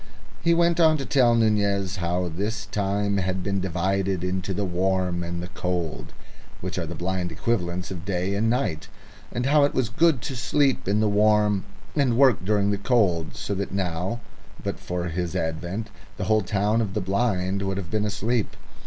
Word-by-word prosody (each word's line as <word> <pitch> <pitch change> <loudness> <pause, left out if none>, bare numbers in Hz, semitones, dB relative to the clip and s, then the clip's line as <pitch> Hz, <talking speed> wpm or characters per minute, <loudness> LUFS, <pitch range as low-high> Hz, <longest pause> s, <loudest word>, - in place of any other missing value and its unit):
He 170 0 +4
went 170 0 +3
on 160 -2 +5
to 135 - -4
tell 125 -4 +4
Nunez 100 -4 +1
how 90 +1 -1
this 105 +6 -3
time 100 0 0
had 95 -1 -1
been 100 0 -1
divided 95 +1 0
into 95 +1 -2
the 100 +2 -1
warm 90 -1 0
and 85 0 -4
the - - -5
cold, 85 -10 -3 0.5
which 95 +1 -4
are 85 - -3
the 85 - -5
blind 90 +1 -2
equivalents 90 -1 -2
of 90 -3 -6
day 95 0 -1
and 110 +3 +1
night, 115 - -1 0.4
and 125 - -2
how 145 +1 +5
it 140 - +1
was 130 -4 +1
good 150 0 +2
to 135 - -4
sleep 135 +1 +1
in 105 +2 +2
the 110 - +3
warm 105 -1 +3 0.3
and 130 -6 +2
work 130 -8 +5
during 100 0 +2
the 100 - -1
cold, 100 - +1
so 100 - -3
that 100 0 -3
now, 95 +3 -2 0.4
but - - -3
for 90 0 -3
his 85 0 -3
advent, 85 +7 -3 0.3
the - - -3
whole 110 0 +3
town 105 +3 +1
of 100 -4 -3
the - - +2
blind 95 -1 0
would 95 -1 -2
have 90 -4 -5
been 110 -1 +1
asleep. 110 +2 -1
100 Hz, 190 wpm, -25 LUFS, 90-110 Hz, 0.5 s, on